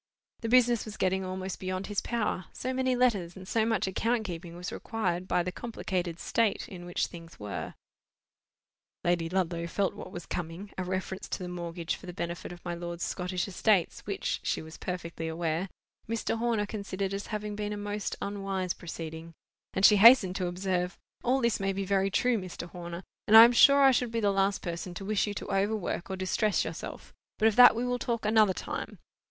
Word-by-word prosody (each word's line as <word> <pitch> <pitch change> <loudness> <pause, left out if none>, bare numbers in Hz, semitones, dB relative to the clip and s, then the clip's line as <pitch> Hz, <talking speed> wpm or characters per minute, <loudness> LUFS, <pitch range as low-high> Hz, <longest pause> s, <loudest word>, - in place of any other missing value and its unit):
The 230 - -3
business 240 -1 +4
was 215 -1 -8
getting 190 0 +1
almost 185 0 -4
beyond 185 +1 -3
his 205 -1 -1
power, 215 -6 -1
so 255 +1 -3
many 260 0 +1
letters 205 -9 +1
and 190 -1 -10
so 225 +1 +1
much 220 -3 +1
account 225 +5 0
keeping 170 -3 -6
was 180 +1 -5
required 185 -5 -2
by 175 - +2
the 180 - -3
complicated 180 -7 -3
state 225 -3 0
in 175 -2 -9
which 175 - 0
things 165 -1 -11
were. 100 -6 -5 1.3
Lady 170 -1 +1
Ludlow 170 -2 -1
felt 195 +2 0
what - - -9
was 175 - -7
coming—a 180 +3 -5
reference 185 +1 -4
to - - -2
the - - -4
mortgage 170 -1 -4
for 185 - -12
the 180 - -6
benefit 170 0 -5
of 175 0 -12
my 175 - -2
lord's 170 0 -5
Scottish 180 0 -2
estates, 195 -1 +2
which, - - -2
she - - -1
was 160 0 -10
perfectly 170 -2 -5
aware, 165 +2 -2 0.4
Mr. 230 0 -1
Horner 230 -3 +1
considered 200 -2 -3
as 200 +1 -4
having 210 -1 -4
been 210 0 -3
a 210 - -3
most 205 0 -3
unwise 195 -2 -2
proceeding—and 165 +3 -5
she 210 - +8
hastened 205 -3 +8
to 185 - -1
observe—"All 185 +8 -2
this 235 -2 +1
may 195 0 0
be 195 0 -2
very 195 0 +2
true, 240 +3 +2
Mr. 180 -2 -7
Horner, 175 0 -7 0.2
and 220 - +9
I 225 - +13
am 235 - +7
sure 280 +3 +7
I 270 - +8
should 250 -1 +1
be 230 - 0
the 205 -2 +2
last 195 0 +1
person 175 0 -5
to 195 - -6
wish 210 +1 +1
you 205 - -3
to - - -5
overwork 200 -2 -1
or 190 - -2
distress 190 +3 +1
yourself; - - -7 0.2
but 220 - +4
of 220 - +2
that 245 -2 +9
we 235 +2 -1
will 245 0 -1
talk 230 -2 -2
another 215 -2 +5
time. - - -5
190 Hz, 195 wpm, -29 LUFS, 175-215 Hz, 1.3 s, I